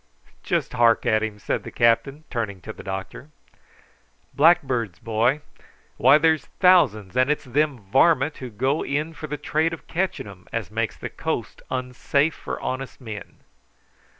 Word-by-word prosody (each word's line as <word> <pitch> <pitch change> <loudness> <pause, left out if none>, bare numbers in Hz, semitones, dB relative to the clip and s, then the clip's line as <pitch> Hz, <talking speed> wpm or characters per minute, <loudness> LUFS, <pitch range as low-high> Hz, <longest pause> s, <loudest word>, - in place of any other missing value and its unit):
"Just - - -1
hark 120 -2 +4
at 110 -1 +3
him," 110 -1 -3
said 105 - -2
the - - -8
captain, 135 +6 +2
turning 110 -6 -3
to - - -7
the - - -11
doctor. 95 +8 -6 1.0
"Blackbirds, 135 - +3
boy, 115 - +1 0.6
why, 150 - +7
there's 160 -2 +2
thousands; 130 - +4
and 130 +2 +3
it's 150 - 0
them 145 +2 0
varmint 135 - +3
who 130 - -7
go 130 +7 0
in 150 +3 -2
for 155 - -7
the 150 0 -4
trade 155 +3 0
of 165 - -8
catching 185 +2 -2
'em 100 -2 -13
as 115 -3 -3
makes 110 -1 -2
the - - -5
coast - - -4
unsafe 130 +4 0
for - - -6
honest 130 +1 -4
men." 110 -5 -9
130 Hz, 155 wpm, -24 LUFS, 110-150 Hz, 1.0 s, why